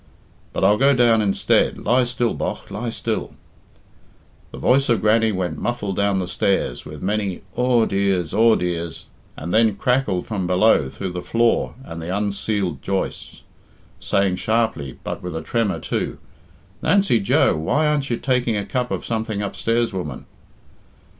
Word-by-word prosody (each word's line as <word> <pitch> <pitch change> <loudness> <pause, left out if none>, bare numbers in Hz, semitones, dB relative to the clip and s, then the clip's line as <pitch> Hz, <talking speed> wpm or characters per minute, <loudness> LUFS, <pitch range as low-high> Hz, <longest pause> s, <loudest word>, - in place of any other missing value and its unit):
But - - -3
I'll 105 - +5
go 140 +1 +5
down 120 -3 +4
instead. 100 -2 +2
Lie 125 +1 +2
still, 120 -1 -1
bogh, - - -4
lie 120 - -3
still!" 115 -1 -3 1.2
The - - -9
voice 135 +1 +3
of 115 -4 +3
Grannie 110 +2 +3
went 95 -3 -3
muffled 105 -5 -2
down 100 0 +1
the 90 -2 -2
stairs 90 -7 -1
with 75 +1 -9
many 100 -1 -2
"Aw 125 -2 +3
dears, 95 -4 0
aw 115 0 +5
dears!" 85 -2 -3 0.3
and 85 +4 -5
then 110 -2 +4
crackled 115 -5 0
from 95 -5 -3
below 90 -6 +3
through 95 +6 -5
the 90 0 -4
floor 115 +3 +1
and 85 -8 -8
the 80 - -6
unceiled 100 -5 -2
joists, 95 -1 -4 0.6
saying 100 -2 +1
sharply 110 - -1
but - - -5
with 90 -2 -6
a 80 - -3
tremor, 115 +1 0
too, - - -3 0.6
"Nancy 195 - +3
Joe, 100 - +3
why 110 - +1
aren't 150 -2 0
you 120 - 0
taking 125 -4 0
a 100 - -2
cup 125 -1 -2
of - - -3
something 110 -2 -2
upstairs, 115 +3 -1
woman?" 85 -8 -5
105 Hz, 160 wpm, -21 LUFS, 90-120 Hz, 1.2 s, I'll